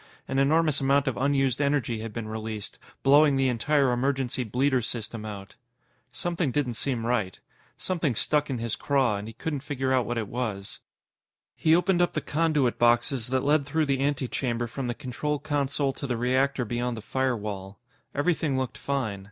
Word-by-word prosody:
An 135 - 0
enormous 155 +1 +3
amount 135 +1 +3
of 130 - 0
unused 135 -1 +1
energy 140 -5 +1
had 110 0 -5
been 110 0 -5
released, 110 -1 -6 0.2
blowing 145 +1 +6
the 135 -1 +2
entire 135 +3 +2
emergency 130 0 0
bleeder 125 +3 +1
system 115 -1 -5
out. 100 -1 -8 0.6
Something 170 -3 -1
didn't 130 -2 0
seem 115 0 -2
right. 110 -7 -1 0.4
Something 165 -9 -1
stuck 150 +6 +1
in 130 - -1
his 115 -1 -2
craw, 130 -7 +1
and 100 +2 -6
he 115 - -8
couldn't 150 +3 -3
figure 135 -2 -1
out 125 -3 +2
what 120 0 -2
it 110 -2 -2
was. 105 -4 -4 0.8
He 160 +1 +4
opened 180 0 +2
up 175 - +2
the - - 0
conduit 150 -5 +1
boxes 120 +1 +3
that 130 0 0
led 145 +1 +3
through 155 +1 +1
the 135 -2 0
antechamber 130 -4 -1
from 125 +2 -4
the 120 - -2
control 150 +2 -2
console 140 -2 -1
to 140 - -6
the 120 -2 -1
reactor 130 +2 +1
beyond 120 +1 -2
the - - -6
firewall. 105 -7 -2 0.4
Everything 150 -2 +1
looked 130 -1 -3
fine. 130 -8 -2
130 Hz, 175 wpm, -27 LUFS, 115-145 Hz, 0.8 s, blowing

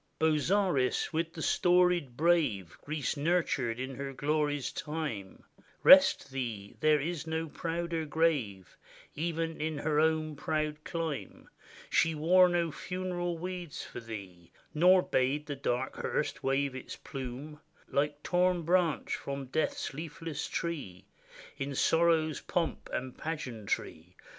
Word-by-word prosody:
Bozzaris! 160 -2 +2
with 165 +1 -1
the 160 - -5
storied 175 -7 +3
brave 150 - +2
Greece 150 -2 -2
nurtured 140 -7 0
in 130 +1 -4
her 135 +1 -5
glory's 145 +1 0
time, 150 -12 -5 0.4
Rest 135 - +7
thee 115 -7 -4
— - - -30
there 155 -1 +5
is 165 +2 -3
no 160 0 -2
prouder 165 +1 -3
grave, 140 - 0 0.4
Even 165 0 -2
in 155 -1 -1
her 150 0 +1
own 155 -1 +1
proud 155 0 -2
clime. 165 -4 -4 0.4
She 160 0 +3
wore 180 +4 +5
no 170 -2 +1
funeral 175 0 -3
weeds 180 -2 -5
for - - -8
thee, 95 -7 -9 0.2
Nor 180 +4 +6
bade 135 +4 +1
the 145 -1 -4
dark 130 -1 -2
hearse 150 -2 -2
wave 135 0 +1
its 130 - -7
plimie 135 +3 -7 0.3
Like 145 +1 -1
torn 180 -1 +2
branch 170 -1 +1
from 140 0 -5
death's 135 +2 -1
leafless 155 0 -5
tree 145 - -4 0.5
In 135 0 -3
sorrow's 160 0 +3
pomp 170 -2 -2
and 130 0 -4
pageantry. 110 - -4
155 Hz, 130 wpm, -31 LUFS, 135-165 Hz, 0.5 s, Rest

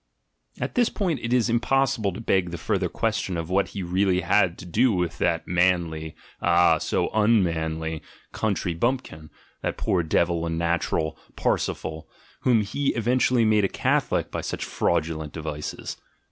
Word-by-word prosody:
At - - -3
this 245 -2 +3
point 180 -8 -1
it 115 - -3
is 125 -2 +3
impossible 120 -3 +1
to 95 - -7
beg 95 -5 +1
the 85 - -5
further 75 - -1
question 90 - -1
of 85 +1 -4
what 100 +1 +2
he 100 - -5
really 90 +1 +1
had 90 0 +2
to - - -10
do 115 +9 +3
with 90 -4 -1
that 85 -1 0
manly 85 -3 +1 0.3
(ah, 85 0 +4
so - - -1
un 110 -1 +4
manly) 80 -1 -2 0.3
country 100 -5 -1
bumpkin, 85 - -2 0.3
that - - -2
poor 90 - +1
devil 85 +1 +1
and 80 0 -2
natural, 85 -2 -1 0.2
Parsifal, 80 0 -2 0.3
whom 120 -4 +3
he 135 +8 -1
eventually 120 +1 +2
made 110 -1 +3
a 95 - +2
Catholic - - 0
by - - -3
such - - -4
fraudulent 80 -1 -1
devices. 75 -2 -5
90 Hz, 160 wpm, -25 LUFS, 80-110 Hz, 0.3 s, ah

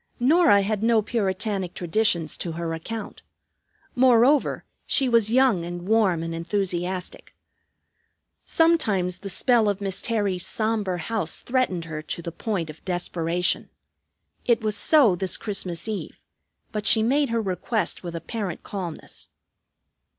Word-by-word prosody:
Norah 275 - +4
had 210 0 -2
no 225 -1 +3
puritanic 200 -3 -2
traditions 175 -3 +1
to 170 - -4
her 165 0 -4
account. 220 +7 -7 0.7
Moreover 255 +2 +3 0.2
she 270 - +2
was 230 -3 +3
young 245 -8 +3
and 175 0 -6
warm 200 -7 +2
and 165 0 -4
enthusiastic. 180 +1 -3 1.1
Sometimes 215 - +1
the 200 - -6
spell 230 +2 +3
of 200 -1 -2
Miss 195 -1 -2
Terry's 205 -6 -1
sombre 215 -4 -1
house 190 -1 -2
threatened 240 -10 -1
her 155 -1 -6
to 170 +2 -6
the 170 - -5
point 170 -4 -3
of 155 - -19
desperation. 175 -1 -1 0.7
It 235 -1 +2
was 215 -1 0
so 275 - +5
this 185 0 +1
Christmas 190 -4 -2
Eve; 215 -2 -6 0.5
but 210 -1 -3
she 220 - +5
made 280 +4 +2
her 230 0 0
request 215 +2 -2
with 170 -2 -7
apparent 180 +2 -5
calmness. 180 -5 -7
200 Hz, 135 wpm, -24 LUFS, 175-230 Hz, 1.1 s, so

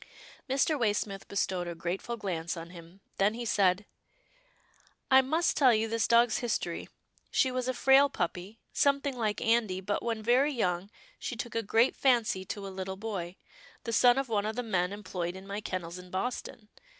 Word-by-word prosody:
Mr. 280 +3 +2
Waysmith 205 -3 -1
bestowed 185 -3 -1
a 170 - -5
grateful 180 +8 -4
glance 175 -5 -3
on 165 +1 -8
him, 170 +2 -13 0.2
then 205 +3 +2
he 240 0 -5
said, 200 -2 +2 0.6
" - - -35
I 265 0 +8
must 315 +6 +1
tell 255 -5 +5
you 220 +1 +1
this 225 0 0
dog's 235 0 +4
his 240 -3 0
tory. 170 -1 -6 0.4
She 260 - +2
was 255 0 -2
a 255 - 0
frail 270 +2 +5
puppy, 185 -2 -4 0.2
something 280 -1 +2
like 215 -4 -1
Andy, 225 -5 +2
but 205 +2 -2
when 225 -2 -3
very 255 +6 +3
young 185 -5 -1 0.3
she - - -4
took 240 0 -5
a 230 - 0
great 225 +4 +2
fancy 235 -8 +2
to 200 +1 -5
a - - -5
little 190 0 -5
boy, 190 -4 -5 0.5
the 230 - -4
son 245 +3 +5
of 270 -1 0
one 210 -2 0
of 220 - -3
the 245 - -2
men 185 -5 0
employed 185 -4 -4
in 190 +1 -10
my 200 +1 -5
kennels 180 -3 -5
in 180 0 -12
Boston. 220 +3 -4
215 Hz, 190 wpm, -30 LUFS, 185-245 Hz, 0.6 s, I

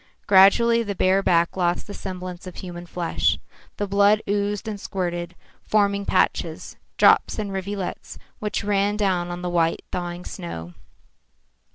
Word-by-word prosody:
Gradually 230 +5 +6
the 205 -3 -3
bare 190 +1 +3
back 170 -3 +2
lost 175 -1 0
the 205 - -8
semblance 185 -2 -7
of 180 - -9
human 175 -1 -8
flesh. 170 -1 0 0.4
The 205 - -1
blood 200 +2 +3
oozed 205 +1 -1
and 205 -2 -5
squirted, 175 -3 -3 0.3
forming 200 -1 +1
patches, - - 0 0.2
drops - - +5
and 205 -2 -3
rivulets, 195 0 -5 0.2
which 210 +1 -2
ran 205 0 +1
down 185 -4 0
on 175 0 -6
the - - -2
white, 165 -1 +1
thawing 175 0 -4
snow. 90 - -7
190 Hz, 145 wpm, -23 LUFS, 175-205 Hz, 0.4 s, Gradually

